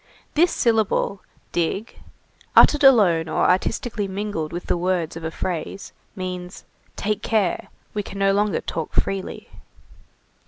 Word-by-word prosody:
This 340 Hz, +4 st, +4 dB
syllable, 220 Hz, -4 st, +1 dB, 0.3 s
dig, 175 Hz, +6 st, -2 dB, 0.6 s
uttered 295 Hz, -1 st, +7 dB
alone 190 Hz, -12 st, +5 dB
or -, -, +2 dB
artistically 205 Hz, +3 st, 0 dB
mingled 195 Hz, -5 st, -3 dB
with 175 Hz, +1 st, -5 dB
the -, -, +1 dB
words 175 Hz, -2 st, -1 dB
of 165 Hz, -, -7 dB
a 160 Hz, -, -2 dB
phrase, 175 Hz, +3 st, -5 dB, 0.2 s
means: 180 Hz, -1 st, -6 dB, 0.3 s
"Take 210 Hz, 0 st, -1 dB
care, 210 Hz, -6 st, 0 dB, 0.3 s
we 210 Hz, -, -1 dB
can 200 Hz, -, -9 dB
no 195 Hz, 0 st, +3 dB
longer 205 Hz, 0 st, +1 dB
talk 160 Hz, -2 st, -4 dB
freely." 195 Hz, -1 st, -2 dB
195 Hz, 130 wpm, -23 LUFS, 175-210 Hz, 0.6 s, uttered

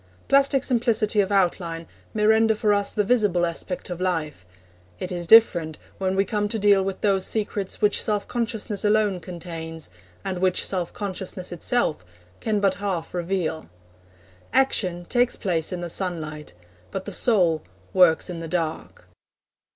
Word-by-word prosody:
Plastic 275 Hz, -1 st, +3 dB
simplicity 225 Hz, -4 st, +2 dB
of 195 Hz, 0 st, -2 dB
outline 175 Hz, -3 st, 0 dB, 0.3 s
may 210 Hz, -1 st, +1 dB
render 220 Hz, 0 st, +4 dB
for 210 Hz, -1 st, +2 dB
us 205 Hz, 0 st, 0 dB
the 210 Hz, -, +1 dB
visible 205 Hz, -6 st, +2 dB
aspect 170 Hz, +2 st, -4 dB
of 175 Hz, 0 st, -5 dB
life; 155 Hz, -, -2 dB, 0.5 s
it 180 Hz, -, -5 dB
is 175 Hz, -1 st, -3 dB
different 175 Hz, -8 st, +5 dB, 0.2 s
when 190 Hz, 0 st, 0 dB
we 195 Hz, +1 st, +2 dB
come 210 Hz, -1 st, -1 dB
to 225 Hz, -, -1 dB
deal 205 Hz, -2 st, +4 dB
with 195 Hz, 0 st, -4 dB
those 195 Hz, -2 st, +2 dB
secrets 205 Hz, -2 st, -1 dB
which 210 Hz, -1 st, +4 dB
self 210 Hz, -2 st, -1 dB
consciousness 225 Hz, -4 st, -2 dB
alone 210 Hz, -3 st, +2 dB
contains, 165 Hz, -, -7 dB, 0.3 s
and 185 Hz, -2 st, -2 dB
which 185 Hz, 0 st, +2 dB
self 180 Hz, -3 st, -2 dB
consciousness 190 Hz, -2 st, -5 dB
itself 175 Hz, -, -1 dB, 0.4 s
can 215 Hz, -2 st, 0 dB
but 195 Hz, -2 st, +2 dB
half 185 Hz, -5 st, -3 dB
reveal. 175 Hz, -3 st, -2 dB, 0.8 s
Action 185 Hz, -9 st, +2 dB
takes 245 Hz, +5 st, +2 dB
place 170 Hz, -6 st, -1 dB
in 180 Hz, -1 st, -4 dB
the 175 Hz, -, -3 dB
sunlight, 155 Hz, -, -4 dB, 0.4 s
but 185 Hz, -, -5 dB
the 205 Hz, -, -5 dB
soul 180 Hz, -7 st, +2 dB, 0.3 s
works 180 Hz, -4 st, +4 dB
in 175 Hz, -2 st, -6 dB
the 165 Hz, -, -6 dB
dark. 160 Hz, -1 st, -4 dB
190 Hz, 155 wpm, -24 LUFS, 175-210 Hz, 0.8 s, different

